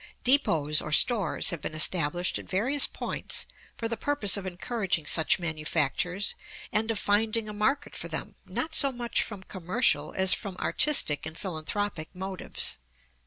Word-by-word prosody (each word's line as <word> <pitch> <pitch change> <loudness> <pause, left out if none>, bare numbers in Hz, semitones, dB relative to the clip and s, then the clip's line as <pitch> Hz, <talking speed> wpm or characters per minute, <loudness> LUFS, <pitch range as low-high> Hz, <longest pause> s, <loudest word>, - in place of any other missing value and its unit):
Depots 160 - +3
or 155 - -7
stores 200 +1 +4
have 170 -4 -4
been 155 - -5
established 165 +2 0
at - - -12
various 255 +9 +3
points - - -2 0.3
for 230 - -2
the 230 - -2
purpose 285 -7 +2
of 195 -2 -3
encouraging 185 -2 -3
such 160 +1 +4
manufactures 165 +2 -1 0.4
and 220 +2 0
of 225 - -1
finding 215 +2 0
a 210 - -6
market 240 +8 -1
for - - -6
them, - - -5
not 320 0 -4
so 280 -3 +5
much 240 -2 -2
from 205 -4 -6
commercial 185 +7 0
as 190 0 +6
from 195 -4 -5
artistic 275 - +3
and 160 +1 -8
philanthropic 180 -1 -4
motives. 185 - -3
195 Hz, 155 wpm, -27 LUFS, 165-230 Hz, 0.4 s, as